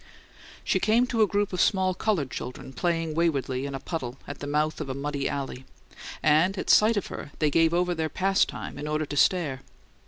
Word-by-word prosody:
She - - +1
came 230 +3 +3
to 235 -3 0
a 215 - +5
group 205 0 0
of 180 - +1
small 190 -2 +2
coloured 180 -9 -1
children 130 +1 -7
playing 165 +2 -1
waywardly 140 -5 0
in 140 - -5
a - - -4
puddle 135 -4 -5
at 145 - -8
the 145 - -6
mouth 150 +2 0
of 145 - -5
a 130 - -3
muddy 140 0 -2
alley; 135 -2 -4 0.6
and 160 +6 +3
at - - +1
sight 215 +1 +5
of 200 - -1
her - - -7
they 150 -2 +1
gave 165 +2 +4
over 175 +1 +1
their 160 -2 -2
pastime 195 +4 0
in 150 - -4
order 155 0 -1
to 145 - -6
stare. 145 -4 +2
155 Hz, 210 wpm, -26 LUFS, 140-185 Hz, 0.6 s, a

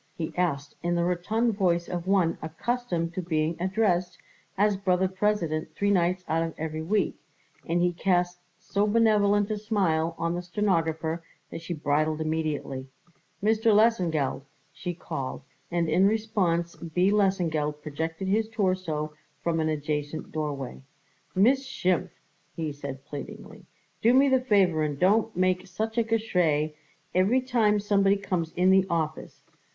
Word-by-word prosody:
he 160 -2 -4
asked 145 -6 -1
in 175 0 0
the 170 - +1
rotund 215 +7 0
voice 175 -4 +1
of 175 0 -4
one 190 -4 +3
accustomed 170 0 -2
to 185 - -2
being 160 -1 0
addressed 185 -2 0 0.4
as 205 +1 +3
Brother 190 -1 +1
President 180 -6 -1
three 200 +3 +1
nights 180 -1 +1
out 160 +1 +1
of 165 -1 -3
every 155 0 -4
week, 195 +2 0 0.5
and 175 +1 +1
he 180 0 +2
cast 175 0 +1 0.2
so 200 +3 -1
benevolent 205 -2 +3
a 210 - -2
smile 170 -7 0
on 170 +1 -1
the 175 - -2
stenographer 165 -4 -1 0.3
that - - -6
she 170 +1 -4
bridled 155 +1 0
immediately. 155 -4 -2 0.6
"Mis 215 +1 +3
ter 225 - +3
Lesengeld," 175 - +2 0.3
she 175 -1 -5
called, 140 -6 -5 0.3
and 170 -1 0
in 180 +5 +4
response 195 -6 0
B. 180 +4 +1
Lesengeld 165 -7 +1
projected 160 +4 -4
his 215 +3 +1
torso 185 -8 -1 0.3
from 165 -1 0
an 155 0 +1
adjacent 150 0 -3
doorway. 145 -5 -4 0.5
"Miss 255 +8 +4
Schimpf," 185 -7 0 0.5
he 160 -2 -3
said 140 -1 -7
pleadingly, 145 -1 -9 0.3
"do 235 +3 +5
me 275 +1 +5
the 260 -1 +3
favour 195 -9 +3
and 150 -2 -1
don't 215 +3 +2
make 185 0 +1
such 220 +4 -3
a - - +3
Geschrei 180 -9 +1 0.4
every 195 +8 +3
time 225 -5 +2
somebody 200 -1 +3
comes 180 -5 -2
in 185 +1 +3
the 190 0 +4
office. 155 -2 -3
180 Hz, 150 wpm, -27 LUFS, 160-205 Hz, 0.6 s, do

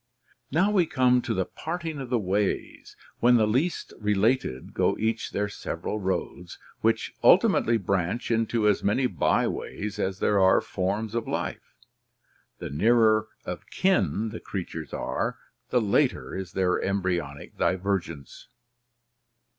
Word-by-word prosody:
Now 180 +8 +2
we 185 -5 +3
come 125 -3 +3
to 120 - -2
the 95 - 0
parting 160 - -5
of 130 -3 -6
the 125 - +2
ways, 100 -1 -2 0.2
when 125 +1 +5
the 110 -2 +4
least 130 +11 -1
related 105 - 0
go - - +1
each 110 +1 -1
their 105 +1 -1
several 100 +1 -4
roads, 90 -2 -3 0.2
which - - 0
ultimately 115 0 +5
branch 100 +4 -1
into 115 -1 +1
as 105 - +2
many 105 +6 +2
byways 105 -3 -1
as 95 -1 -1
there 105 +1 +2
are 95 0 +5
forms 105 0 -2
of 115 -1 -2
life. - - -4 0.8
The - - -6
nearer 110 +5 +3 0.2
of 90 -1 -6
kin 180 - +1
the 110 - -7
creatures 85 -4 -6
are, - - -2 0.3
the 125 - +3
later 105 -3 +1
is 95 -2 -6
their 95 -1 +1
embryonic 90 -7 -2
divergence. 90 -6 -2
105 Hz, 135 wpm, -26 LUFS, 95-120 Hz, 0.8 s, when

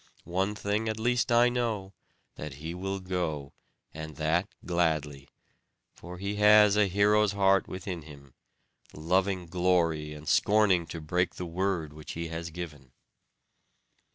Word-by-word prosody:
One 95 +3 0
thing 105 +2 -1
at 110 0 -3
least 120 +1 +1
I 120 +1 +6
know, 110 -6 -2 0.4
that 75 -2 -7
he 80 +4 -6
will 95 +2 -3
go, 85 -7 -3 0.4
and 80 -1 -7
that 80 +5 +1 0.2
gladly; 75 -5 -1 0.7
for 90 +1 -10
he 100 +2 -3
has 105 0 +6
a 105 -1 +4
hero's 105 +2 +3
heart 95 -1 +3
within 90 -2 -5
him; 70 -3 -14 0.6
loving 90 +3 0
glory, 85 -4 0
and 75 +1 -11
scorning 100 -5 +3
to 80 -1 -7
break 90 +3 0
the 90 - -5
word 85 -3 -2
which 75 0 -9
he 85 0 -4
has 85 0 -5
given." 75 -6 -9
90 Hz, 140 wpm, -29 LUFS, 80-100 Hz, 0.7 s, I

